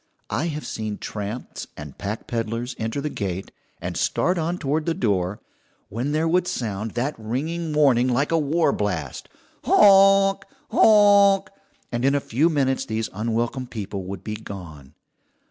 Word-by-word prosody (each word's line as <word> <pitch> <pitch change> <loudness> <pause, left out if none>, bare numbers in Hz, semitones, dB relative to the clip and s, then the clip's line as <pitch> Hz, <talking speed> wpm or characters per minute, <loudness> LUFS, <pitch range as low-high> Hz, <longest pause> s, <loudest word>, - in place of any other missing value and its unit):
I 145 +8 0
have 150 -2 -4
seen 110 -2 -4
tramps 105 +3 -6
and 75 -2 -9
pack 100 +2 -5
peddlers 115 +2 -3
enter 115 +5 -2
the 150 - -2
gate, 95 -1 -4 0.3
and - - -5
start 180 0 +1
on 170 +2 -1
toward 155 0 -1
the 165 - +1
door, 100 -5 0 0.5
when 120 +7 -2
there 155 +2 +1
would 180 +2 +2
sound 110 - -3
that 130 +5 -1
ringing 155 +9 -3
warning 135 -5 +4
like 130 +5 +1
a 165 - +3
war 155 0 +2
blast, 90 -10 -3 0.3
"Honk, 195 -1 +6 0.3
honk!" 205 -2 +5 0.4
and 120 0 -2
in 135 +1 +3
a - - +3
few 140 +5 +1
minutes 135 -4 +1
these 110 -3 -3
unwelcome 115 +4 -2
people 100 -5 -5
would 95 0 -7
be 105 - -4
gone. 80 -9 -10
125 Hz, 155 wpm, -23 LUFS, 105-160 Hz, 0.5 s, Honk